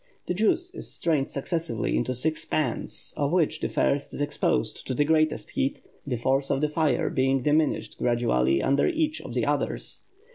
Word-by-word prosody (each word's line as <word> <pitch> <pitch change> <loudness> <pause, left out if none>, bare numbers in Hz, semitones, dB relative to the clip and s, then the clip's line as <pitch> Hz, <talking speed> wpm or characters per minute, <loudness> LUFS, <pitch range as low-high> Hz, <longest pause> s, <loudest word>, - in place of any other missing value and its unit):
The - - -1
juice 225 - +1
is - - -5
strained 150 -5 0
successively 140 - -2
into 130 - 0
six 155 +5 -1
pans, 150 -6 -2
of 145 0 0
which 160 -3 +2
the - - -2
first 140 0 0
is - - -6
exposed 145 - -1
to 130 - -1
the 145 - +2
greatest 155 0 +1
heat, 135 - -1 0.2
the 130 - 0
force 135 +4 +1
of 135 - +1
the 150 - +2
fire 155 -2 +1
being 135 0 +2
diminished 150 +1 +1
gradually 70 - +2
under 140 +1 +3
each 320 -2 0
of - - -8
the - - +1
others. - - -2
145 Hz, 180 wpm, -26 LUFS, 130-160 Hz, 0.2 s, under